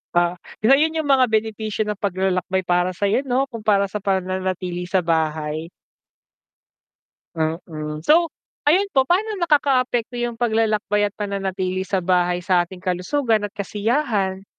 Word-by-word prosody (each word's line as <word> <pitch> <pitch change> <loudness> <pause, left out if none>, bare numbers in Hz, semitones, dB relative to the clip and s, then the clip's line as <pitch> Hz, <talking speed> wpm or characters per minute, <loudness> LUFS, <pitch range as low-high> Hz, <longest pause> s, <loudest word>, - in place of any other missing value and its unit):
Ah, 175 0 +2 0.2
so 235 - +5
yun 320 +1 +1
yung 310 -3 -2
mga 260 -2 +5
benepisyo 220 -1 -1
ng 210 -1 -4
paglalakbay 190 -1 0
para 180 +1 +1
sayo 200 +5 +1
'no 255 +2 +2
kumpara 205 -3 +1
sa 210 - -3
pananatili 185 -2 -2
sa 185 -1 +1
bahay. 155 -1 -1 1.7
Mm, 155 -1 -3
so 330 +1 +4 0.3
ayun 365 +7 +3
po 265 - +5
paano 410 +8 0
nakakaapekto 260 -7 +1
yung 240 -1 -3
paglalakbay 215 -3 +1
at - - -28
pananatili 190 -2 -2
sa 190 0 -1
bahay 180 0 +1
sa 180 0 +2
ating 180 +1 -11
kalusugan 215 +5 0
at - - -22
kasiyahan? 205 -2 -1
200 Hz, 135 wpm, -22 LUFS, 180-235 Hz, 1.7 s, so